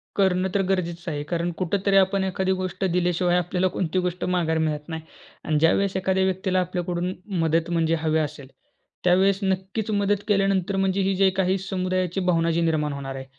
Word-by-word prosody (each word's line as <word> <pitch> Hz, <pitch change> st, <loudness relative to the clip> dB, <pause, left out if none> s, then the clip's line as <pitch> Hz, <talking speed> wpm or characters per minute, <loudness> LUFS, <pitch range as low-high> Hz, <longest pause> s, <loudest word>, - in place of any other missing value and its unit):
करणं 190 Hz, -1 st, +2 dB
तर 200 Hz, -, +2 dB
गरजेचं 175 Hz, -2 st, -2 dB
आहे. 145 Hz, -1 st, -3 dB
कारण 170 Hz, 0 st, 0 dB
कुठेतरी 195 Hz, +2 st, 0 dB
आपण 190 Hz, 0 st, +3 dB
एखादी 190 Hz, 0 st, -1 dB
गोष्ट 185 Hz, +1 st, -3 dB
दिल्याशिवाय 180 Hz, 0 st, +2 dB
आपल्याला 180 Hz, +1 st, 0 dB
कोणती 185 Hz, 0 st, 0 dB
गोष्ट 180 Hz, 0 st, -3 dB
माघारी 170 Hz, -3 st, 0 dB
मिळत 150 Hz, -1 st, -2 dB
नाही. 160 Hz, -1 st, -4 dB, 0.4 s
आणि 155 Hz, -2 st, 0 dB
ज्यावेळेस 190 Hz, +5 st, +2 dB
एखाद्या 190 Hz, 0 st, +1 dB
व्यक्तीला 190 Hz, 0 st, 0 dB
आपल्याकडून 180 Hz, 0 st, -2 dB, 0.3 s
मदत 165 Hz, +1 st, +1 dB
म्हणजे 165 Hz, -1 st, +2 dB
हवी 160 Hz, 0 st, +1 dB
असेल, 145 Hz, -3 st, -4 dB, 0.6 s
त्यावेळेस 190 Hz, +2 st, +3 dB
नक्कीच 190 Hz, +3 st, -2 dB
मदत 205 Hz, 0 st, +1 dB
केल्यानंतर 195 Hz, -2 st, +1 dB
म्हणजे 195 Hz, 0 st, +1 dB
ही 195 Hz, 0 st, +1 dB
जी 195 Hz, 0 st, +4 dB
काही 190 Hz, 0 st, +2 dB
समुदायाची 185 Hz, -1 st, -2 dB
भावना 170 Hz, -3 st, +2 dB
जी 165 Hz, +1 st, +1 dB
निर्माण 155 Hz, -3 st, 0 dB
होणार 135 Hz, -1 st, -6 dB
आहे, 135 Hz, -, -7 dB
180 Hz, 175 wpm, -24 LUFS, 165-190 Hz, 0.6 s, जी